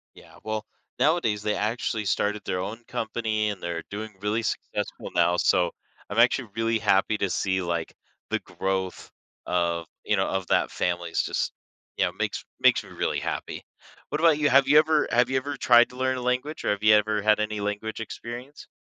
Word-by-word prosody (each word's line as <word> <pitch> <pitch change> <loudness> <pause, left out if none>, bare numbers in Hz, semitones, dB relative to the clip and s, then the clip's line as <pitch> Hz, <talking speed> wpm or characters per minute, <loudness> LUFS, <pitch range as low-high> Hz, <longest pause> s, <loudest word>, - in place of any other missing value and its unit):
Yeah. - - -16
Well, 110 0 -3 0.3
nowadays 125 -7 +2
they 105 - 0
actually 110 0 -1
started 105 +1 0
their 90 - -2
own 110 +5 -5
company 110 -1 -1
and 100 -3 -7
they're 85 -1 -3
doing 105 0 -6
really 105 +3 0
successful 110 - -4
now, 85 0 +3
so 90 0 +3 0.4
I'm 105 - -4
actually 120 +1 +4
really 115 0 +1
happy 105 0 +2
to 100 -2 0
see, 95 -1 0
like, 85 -2 -3 0.4
the - - 0
growth 95 -1 -3 0.4
of 85 -1 0 0.2
you - - +2
know, - - +1
of 95 -1 -2
that - - +2
family 85 -1 -2
is - - +1
just - - -2 0.4
you - - +2
know, - - -1
makes - - -3 0.2
makes - - +5
me - - -14
really - - -1
happy. - - -4 0.4
What 150 - -2
about 160 -2 +5
you? 145 - +3
Have 135 +1 +6
you 150 +2 +7
ever 155 -1 +3
have 125 +2 +3
you 130 - +1
ever 140 +2 -2
tried 120 -2 +6
to 125 - -13
learn 130 0 0
a 125 - -5
language 125 +5 -2
or - - +1
have 105 0 -1
you 110 0 +7
ever 105 0 +2
had 105 0 +4
any 105 -1 -2
language 105 +2 -3
experience? 120 +5 -8
110 Hz, 200 wpm, -26 LUFS, 100-125 Hz, 0.4 s, you